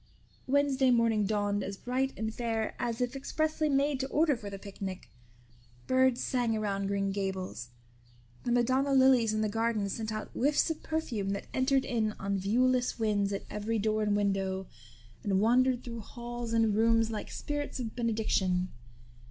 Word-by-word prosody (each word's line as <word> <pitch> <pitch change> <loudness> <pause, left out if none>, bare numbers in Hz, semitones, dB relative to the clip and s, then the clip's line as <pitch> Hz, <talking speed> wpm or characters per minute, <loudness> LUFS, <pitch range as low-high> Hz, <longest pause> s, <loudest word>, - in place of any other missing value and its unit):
Wednesday 275 -1 +3
morning 230 -4 +3
dawned 205 -1 0
as 195 0 -5
bright 260 +4 -1
and 220 0 -2
fair 225 -2 -2
as 235 0 -2
if 245 +2 -1
expressly 310 +3 -1
made 280 0 +2
to 265 - -1
order 295 +1 +2
for 210 -4 -7
the 200 - -6
picnic. 195 -1 -7 0.7
Birds 260 -1 +3
sang 240 -3 0
around 200 -2 -1
Green 195 0 0
Gables; 190 - -4 0.7
the 240 - -1
Madonna 260 +3 +2
lilies 260 -4 +5
in 215 0 0
the 215 - +1
garden 225 -1 0
sent 220 +2 -3
out 215 0 -5
whiffs 290 +4 +2
of 320 - -5
perfume 240 -11 -2
that 200 - -4
entered 265 +1 +2
in 220 -3 0
on 195 -1 -2
viewless 250 +5 +2
winds 205 -3 +1
at 200 - -4
every 215 +2 -2
door 215 +1 +1
and 210 -1 +2
window, 195 -2 0 0.6
and 195 -2 +1
wandered 250 +3 +3
through 235 -1 -6
halls 240 +1 -6
and 225 -2 +3
rooms 225 +1 +3
like 215 - -5
spirits 290 -2 -4
of 225 -3 -5
benediction. 215 -6 0
225 Hz, 165 wpm, -30 LUFS, 205-255 Hz, 0.7 s, lilies